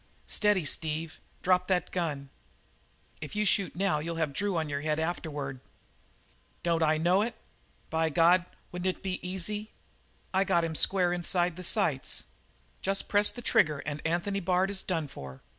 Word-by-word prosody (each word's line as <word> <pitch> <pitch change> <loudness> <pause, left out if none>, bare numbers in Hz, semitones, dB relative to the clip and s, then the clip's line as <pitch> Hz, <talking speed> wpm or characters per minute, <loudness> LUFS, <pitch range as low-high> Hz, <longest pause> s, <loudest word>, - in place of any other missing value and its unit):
"Steady, 205 -6 +2
Steve! 160 +2 -1 0.2
Drop 180 0 +3
that 180 -3 +1
gun! 145 -6 -2 0.9
If 150 - -6
you 210 0 +1
shoot 200 -1 +2
now 185 -4 +1
you'll 165 +2 -4
have 160 -3 -1
Drew 200 +2 -1
on 160 -1 0
your 140 -1 -3
head 155 0 0
afterward." 150 -5 -3 1.0
"Don't 170 -1 +1
I 155 -1 +3
know 175 +5 +3
it? 230 +1 -2 0.6
But 160 -1 0
God, 175 +1 +5 0.2
wouldn't 180 +1 -1
it - - -25
be 185 -1 -2
easy? 200 +4 -3 0.6
I 190 +1 +4
got 170 -3 +2
him 165 -1 -1
square 180 +2 +3
inside 175 -1 +1
the 185 - -7
sights. 170 - 0 0.6
Jest 195 0 -1
press 205 0 +4
the 245 - -8
trigger 150 -8 +3
and 150 0 -4
Anthony 175 +5 0
Bard 185 +1 +1
is 195 -1 -2
done 165 -5 -1
for. 70 - -10
175 Hz, 165 wpm, -29 LUFS, 155-190 Hz, 1.0 s, God